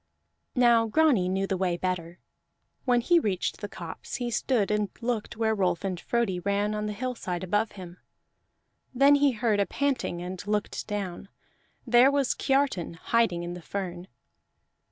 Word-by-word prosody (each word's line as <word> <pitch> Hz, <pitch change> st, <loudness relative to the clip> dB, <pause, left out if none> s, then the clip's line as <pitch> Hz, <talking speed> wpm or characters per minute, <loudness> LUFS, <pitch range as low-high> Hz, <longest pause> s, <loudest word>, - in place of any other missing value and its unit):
Now 235 Hz, -2 st, +5 dB
Grani 240 Hz, -8 st, +3 dB
knew 190 Hz, +1 st, 0 dB
the 190 Hz, -1 st, -1 dB
way 180 Hz, -2 st, 0 dB
better. 175 Hz, -1 st, -3 dB, 0.7 s
When 245 Hz, -2 st, +3 dB
he 345 Hz, +7 st, +4 dB
reached 195 Hz, -, -2 dB
the 205 Hz, -, -4 dB
copse 170 Hz, -4 st, -7 dB
he 245 Hz, -1 st, -3 dB
stood 225 Hz, -3 st, +1 dB
and 210 Hz, -1 st, 0 dB
looked 230 Hz, -3 st, -3 dB
where 220 Hz, -1 st, +2 dB
Rolf 185 Hz, -4 st, 0 dB
and 185 Hz, -3 st, -2 dB
Frodi 225 Hz, -6 st, 0 dB
ran 200 Hz, +3 st, 0 dB
on 210 Hz, 0 st, -2 dB
the 210 Hz, -, -3 dB
hillside 205 Hz, -6 st, -4 dB
above 210 Hz, +4 st, 0 dB
him. 180 Hz, -3 st, -10 dB, 1.0 s
Then 275 Hz, +3 st, +6 dB
he 285 Hz, -2 st, +4 dB
heard 220 Hz, -2 st, +1 dB
a 200 Hz, -, +2 dB
panting, 275 Hz, -11 st, -1 dB
and 180 Hz, +1 st, -5 dB
looked 210 Hz, 0 st, -2 dB
down. 200 Hz, -2 st, -4 dB, 0.6 s
There 245 Hz, +2 st, +6 dB
was 280 Hz, -2 st, +1 dB
Kiartan 270 Hz, -, 0 dB
hiding 180 Hz, -1 st, +1 dB
in 175 Hz, 0 st, -4 dB
the 180 Hz, -, -8 dB
fern. 180 Hz, -1 st, -5 dB
210 Hz, 160 wpm, -27 LUFS, 185-240 Hz, 1.0 s, Then